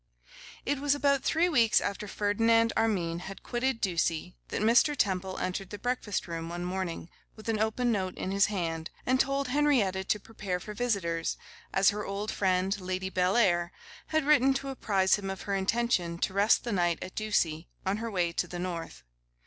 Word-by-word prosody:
IT 285 0 0
WAS 290 0 +2
about 280 -1 +2
three 330 +5 +2
weeks 240 -8 +4
after 200 +1 -3
Ferdinand 225 +3 +2
Armine 185 -7 0
had 190 +2 -9
quitted 245 0 -1
Ducie 175 -2 0
that - - -3
Mr. 245 +7 +4
Temple 190 -4 0
entered 185 +1 -3
the 205 - -6
breakfast 235 -4 -2
room 165 -1 -5
one 175 +1 -4
morning, 180 -3 -3 0.3
with 215 - -12
an 225 -2 0
open 220 +3 +1
note 190 -4 -1
in 190 - -3
his 200 0 +4
hand, 165 -5 -3 0.2
and 255 +1 +2
told 275 0 +1
Henrietta 250 -10 +2
to 210 +2 0
prepare 200 -4 -4
for 210 +4 -8
visitors, 195 -8 -1 0.3
as 190 +1 +4
her 210 +1 -4
old 200 +2 -3
friend, 190 +1 +1
Lady 185 +1 -3
Bellair, 180 -2 +2 0.4
had 315 -2 0
written 275 -2 +5
to 275 0 -3
apprise 195 -8 +2
him 195 -1 -5
of 190 -1 -5
her 200 - -2
intention 195 -3 0
to 185 - -1
rest 200 +3 +4
the 235 - -3
night 175 -4 +1
at 185 - -8
Ducie, 175 -7 0 0.2
on 190 +2 0
her 230 +1 -4
way 175 -5 0
to - - -1
the 175 - -6
North. 175 - -5
200 Hz, 185 wpm, -29 LUFS, 180-235 Hz, 0.4 s, written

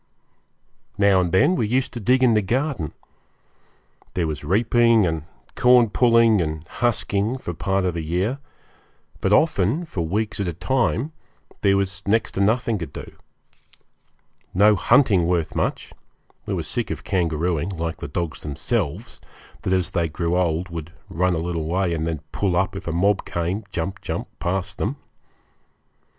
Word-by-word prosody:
Now 100 -2 +4
and 90 -2 -1
then 145 - +4
we 115 - 0
used 130 +4 0
to 120 - -5
dig 125 +4 +3
in 120 -3 +5
the 105 - +3
garden. 120 - -1 1.2
There 90 - +1
was 75 -2 -4
reaping 115 +5 +3
and 80 -3 -2 0.3
corn 125 -3 +5
pulling 115 -4 +4
and 80 0 -4
husking 115 -1 0
for 90 -9 -5
part 95 +3 0
of 90 - 0
the 85 - -3
year; 90 - -1 0.8
but 95 - 0
often, 140 - +2
for 95 - -4
weeks 105 +6 -2
at 100 - -1
a 85 - -2
time, 125 - 0 0.5
there 100 -1 +4
was 95 0 -2
next 110 +1 +2
to 95 - -2
nothing 110 +1 +1
to 85 - -4
do. - - -9 1.4
No 105 +3 +6
hunting 100 - +4
worth 85 -3 0
much - - -2 0.5
we - - -1
were - - -2
sick - - -2
of - - -5
kangarooing, 85 -2 0
like 85 -2 -3
the - - -6
dogs 85 +2 -4
themselves, 75 - -3 0.4
that - - -2
as 95 -2 +1
they 85 -3 0
grew 85 +2 -1
old 90 0 0
would 85 0 -7 0.2
run 90 +2 +1
a 80 +1 -2
little 85 -3 -2
way 90 +1 0
and 80 0 -2
then 80 -3 -3
pull 95 -4 0
up 95 +2 0
if 95 - -7
a - - 0
mob 95 +4 +2
came, 90 +5 -3
jump, 95 +3 -3
jump, - - -4
past 95 +1 -2
them. 115 +8 -1
95 Hz, 165 wpm, -23 LUFS, 85-110 Hz, 1.4 s, No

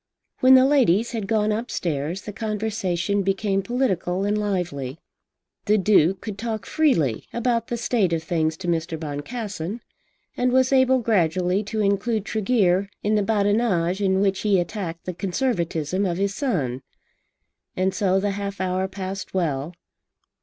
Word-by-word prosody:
When 260 +1 +7
the 260 0 +7
ladies 235 -6 +3
had 220 -5 -3
gone 215 0 +1
upstairs 175 - -2
the 210 - -7
conversation 205 -3 -1
became 195 +1 0
political 195 -5 -1
and 205 +1 +1
lively. 175 -10 -2 0.7
The 215 0 +3
Duke 190 -2 +3
could 205 -2 -6
talk 220 -1 -3
freely 165 - +1
about 235 -1 0
the 240 - -3
state 225 -6 +1
of 165 -1 -1
things 160 -2 0
to 180 - -7
Mr. 165 -1 -1
Boncassen, 180 +6 -5 0.6
and 250 0 +1
was 260 +1 +3
able 260 0 +5
gradually 185 -3 +1
to 215 +1 -2
include 205 +1 0
Tregear 200 -4 +1
in 210 - +1
the 210 - +3
badinage 205 -3 +1
with 190 -1 +2
which 195 -1 +1
he 205 -3 +2
attacked 175 -2 -4
the 180 - -3
Conservatism 180 - -1
of 175 -1 -2
his 200 +1 0
son. 150 - -1 0.9
And 185 +1 0
so 195 -3 +2
the 200 +1 0
half 200 -1 -5
hour 185 0 0
passed 190 0 -6
well. 160 -2 -1
195 Hz, 150 wpm, -23 LUFS, 175-220 Hz, 0.9 s, When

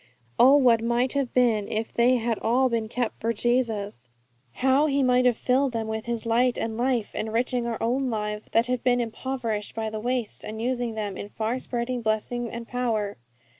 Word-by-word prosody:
Oh, 265 +3 +8
what 240 -5 +4
might 240 +2 +1
have 275 -3 -1
been 230 -5 +2
if 220 +1 -3
they 245 +2 +4
had 230 -1 -1
all 255 +3 +2
been 225 -2 -1
kept 240 -1 -2
for 230 - 0
Jesus! 215 - -1 0.4
How 265 - +3
He 280 -1 +1
might 250 0 +3
have 245 - +2
filled 260 +1 +1
them 225 -1 -2
with 220 +1 -4
His 235 -1 -3
light 240 +2 +2
and 225 -1 -3
life, 240 -2 0
enriching 235 +2 -1
our 230 -1 -2
own 255 +3 0
lives 210 -1 -3
that 230 +1 +3
have 250 0 -2
been 245 -1 +3
impoverished 230 -2 -3
by 220 -1 -3
the 215 - -4
waste, 245 0 -2
and 220 +1 -6
using 245 -1 -2
them 205 -3 -4
in 205 - -7
far 225 +4 -2
spreading 245 0 -3
blessing 230 +2 -1
and 235 0 -7
power! 225 -5 -1
235 Hz, 195 wpm, -25 LUFS, 220-250 Hz, 0.4 s, Oh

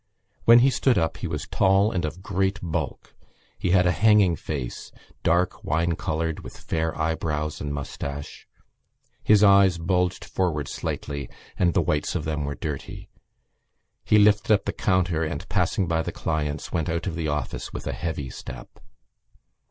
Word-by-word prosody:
When 120 +1 +8
he 135 - +4
stood 130 -1 +2
up 80 -2 0
he 90 - -4
was 75 -3 -4
tall 95 +2 +3
and 90 -6 -1
of 80 +5 -6
great 95 +1 0
bulk. 80 -4 -4 0.5
He - - -1
had 90 0 +4
a 90 - +4
hanging 105 -4 +4
face, 70 -7 -5 0.3
dark 90 +2 +1
wine 85 +2 0
coloured, 80 +1 -2
with - - -10
fair 80 0 -2
eyebrows 80 -1 -2
and 75 - -3
moustache: 70 0 -6 0.8
his 105 -1 +5
eyes 100 -3 +6
bulged 90 +2 0
forward 75 -7 -1
slightly 70 -3 -4 0.3
and 85 -2 +1
the - - +3
whites 75 -1 -1
of 75 - -2
them 75 -2 -2
were 70 0 -3
dirty. 75 -4 -6 0.9
He 105 - +4
lifted 105 +1 +4
up 100 - -4
the - - -2
counter 90 -4 +1
and, 75 -2 -4
passing 95 - +1
by 80 0 +1
the - - -4
clients, 75 -2 -3
went 80 -2 -1
out 85 +1 -2
of 95 - -2
the 80 -1 -3
office 75 0 -3
with - - -7
a - - -2
heavy 75 -6 -4
step. 60 -1 -10
80 Hz, 165 wpm, -25 LUFS, 75-95 Hz, 0.9 s, When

